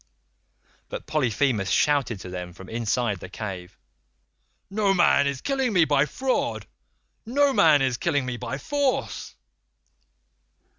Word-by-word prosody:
"But - - -6
Polyphemus 125 -7 0
shouted 140 -8 +2
to 90 - -8
them 90 -1 -6
from 95 +2 -12
inside 115 -2 -1
the 90 - -9
cave, 95 -3 -7 0.9
'Noman 195 -8 +3
is 140 -2 -3
killing 265 -4 0
me 175 -4 +5
by 145 -1 +2
fraud; 260 - -1 0.6
no 275 +4 +2
man 155 - +5
is 130 -2 0
killing 145 +1 0
me 125 -1 -3
by 120 +2 -5
force. 280 - -2
140 Hz, 120 wpm, -25 LUFS, -, 0.9 s, me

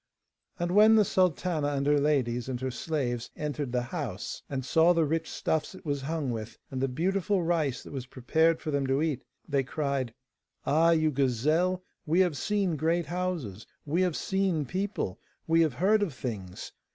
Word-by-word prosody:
And 175 -1 -1
when 215 +3 +7
the 215 -2 +5
sultana 175 -4 +1
and 140 0 -1
her 145 0 +4
ladies 130 -4 +1
and 125 -2 -3
her 130 0 -2
slaves 120 -3 -2
entered 145 -3 -3
the 125 0 0
house, 125 - -4
and 130 -2 -3
saw 165 +4 +5
the 165 -2 +2
rich 160 +2 -1
stuffs 160 +4 -1
it 185 - -14
was 140 -2 -1
hung 150 -2 -2
with, 110 -1 -6
and 130 -1 -3
the 135 - +2
beautiful 185 +7 0
rice 155 -7 0
that - - -10
was 130 -2 -5
prepared 160 +6 +2
for 155 - -3
them 140 -2 0
to 135 +3 +2
eat, 150 -6 -1 0.3
they 140 -3 +2
cried: 135 -3 -2 0.5
'Ah, 160 +3 +4
you 155 -2 +3
gazelle, 155 +8 +1 0.2
we 170 +4 +4
have 175 -5 +2
seen 195 -3 0
great 165 +3 +1
houses, 165 - -3 0.2
we 160 +5 +1
have 180 -4 +1
seen 190 -6 0
people, 185 - -3 0.3
we 165 0 +4
have 155 -7 +2
heard 205 +8 +3
of 175 -10 -1
things. 100 -8 -6
155 Hz, 185 wpm, -29 LUFS, 130-175 Hz, 0.5 s, when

